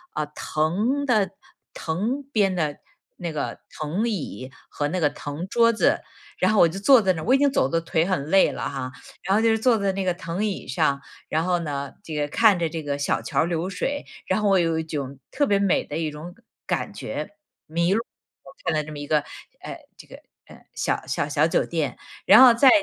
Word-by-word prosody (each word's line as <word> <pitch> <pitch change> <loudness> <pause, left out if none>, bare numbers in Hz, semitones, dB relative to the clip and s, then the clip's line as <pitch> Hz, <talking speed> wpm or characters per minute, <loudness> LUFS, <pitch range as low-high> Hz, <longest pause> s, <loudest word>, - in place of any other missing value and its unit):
呃， 150 - -1
藤 210 - 0
的 210 -7 +2 0.4
藤 215 - -2
编 200 -4 +3
的 150 -4 -1 0.4
那 170 -2 -4
个 150 - -4 0.2
藤 180 +10 -1
椅 135 - -5 0.2
和 145 - -2
那 185 +2 -2
个 150 -3 +3
藤 145 +6 -6
桌 230 +2 +3
子， - - +2 0.4
然 220 - +3
后 210 - +3
我 170 - +7
就 175 +4 -6
坐 250 +3 +6
在 190 -2 +2
那 160 - -5
儿， - - -6
我 255 - +3
已 - - +5
经 285 -1 +3
走 130 - +2
得 165 +2 0
腿 165 0 0
很 180 -7 -1
累 195 - +5
了 - - -4
哈， 130 -2 -5 0.3
然 190 +2 +1
后 220 - +3
就 225 -1 +4
坐 230 0 +3
在 200 -1 +1
那 195 0 -2
个 180 - +2
藤 175 +4 -3
椅 200 -3 -4
上， 140 +2 +1 0.3
然 160 +1 +1
后 180 0 +1
呢， 140 -4 -4
这 160 - -8
个， 145 -1 0
看 205 +3 +4
着 165 -2 0
这 160 -1 -5
个 140 -1 -2
小 145 - 0
桥 - - -1
儿 165 - +1
流 170 +2 -2
水， 285 +7 -3 0.2
然 185 - +1
后 205 - +2
我 190 -2 +4
有 165 -1 +1
一 - - -2
种 140 -4 -5
特 285 - +1
别 200 - +3
美 200 -2 +2
的 150 - -5
一 160 -2 -2
种 165 +4 -9 0.3
感 - - -2
觉。 - - -5 0.4
迷 170 +3 +1
路， 225 - +2 0.7
看 - - +1
到 150 - 0
这 155 - -9
么 145 - -7
一 145 - -6
个， 155 -1 +3 0.4
呃， - - -7 0.2
这 - - -14
个， - - -11 0.3
呃， - - -14 0.2
小 - - -2
小 - - -1
小 150 +2 +3
酒 - - +1
店。 155 -7 -2 0.3
然 - - +8
后 250 -2 +9
再 260 +3 +6
170 Hz, 240 characters per minute, -24 LUFS, 150-205 Hz, 0.7 s, 后